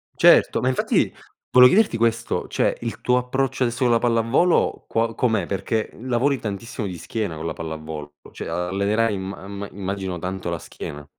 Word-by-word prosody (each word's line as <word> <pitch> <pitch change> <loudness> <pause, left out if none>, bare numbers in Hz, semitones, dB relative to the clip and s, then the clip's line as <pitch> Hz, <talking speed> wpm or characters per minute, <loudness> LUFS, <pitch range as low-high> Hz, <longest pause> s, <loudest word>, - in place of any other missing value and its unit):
Certo. - - +5
Ma 130 - +2
infatti 130 - +1 0.4
volevo 125 0 +9
chiederti 205 - +3
questo, 115 0 0
cioè - - 0
il 115 -1 -5
tuo 125 0 +3
approccio 130 +1 0
adesso 120 +1 -1
con 120 - +3
la 115 - +4
pallavolo 120 +9 +2
qua 115 0 0
com'è 110 -7 +1
perché 110 +3 -1
lavori 130 +2 +1
tantissimo 110 +3 -5
di 90 -2 -6
schiena 100 0 -3
con 80 +1 -6
la 80 - -2
pallavolo, 80 -2 -6 0.2
cioè - - -7
allenerai 100 +6 0
imma 95 0 -6
imma 100 0 -6
immagino 95 -2 -4
tanto 90 0 -4
la 85 - -3
schiena. 75 -2 -8
110 Hz, 170 wpm, -23 LUFS, 95-120 Hz, 0.4 s, volevo